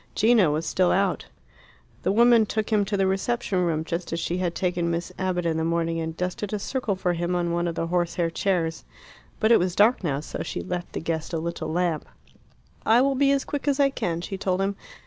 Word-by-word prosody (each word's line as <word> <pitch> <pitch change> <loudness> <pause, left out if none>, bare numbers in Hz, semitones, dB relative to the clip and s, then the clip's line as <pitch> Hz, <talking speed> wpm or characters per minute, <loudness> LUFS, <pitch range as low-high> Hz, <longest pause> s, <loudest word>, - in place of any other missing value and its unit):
Gino 220 -7 +4
was 155 +2 -1
still 180 +3 +2
out. 195 -1 +1 0.7
The - - +1
woman 230 0 +5
took 215 +1 -2
him 210 -2 +3
to 200 0 -1
the 195 - +2
reception 195 0 0
room, 160 -2 0
just 170 +2 -4
as 165 - -1
she 170 +2 -2
had 175 -2 -1
taken 175 -2 0
Miss 170 +2 -2
Abbott 185 -2 -1
in 165 -1 0
the 160 - 0
morning, 165 0 0
and 160 0 -4
dusted 185 +3 -3
a - - +1
circle 220 -1 -2
for 180 -1 0
him 175 +1 -1
on 175 -1 0
one 170 0 0
of 165 - -3
the 165 - -1
horsehair 175 0 0
chairs. 165 -3 -1 0.6
But 220 +1 +3
it 230 - +7
was 180 0 -1
dark 215 +2 +4
now, 140 -5 0
so 150 - -6
she - - -4
left 180 -1 -5
the - - -3
guest 165 +1 -3
a - - +1
little 160 -1 -4
lamp. 170 -2 -1 0.8
"I 235 +3 +5
will 275 0 +2
be 275 +1 +3
as 275 -1 +1
quick 290 0 -4
as 285 -1 +2
I 275 -1 +4
can," 170 -9 -2
she 190 +2 -5
told 185 -2 0
him. 195 +1 0
180 Hz, 230 wpm, -25 LUFS, 170-205 Hz, 0.8 s, it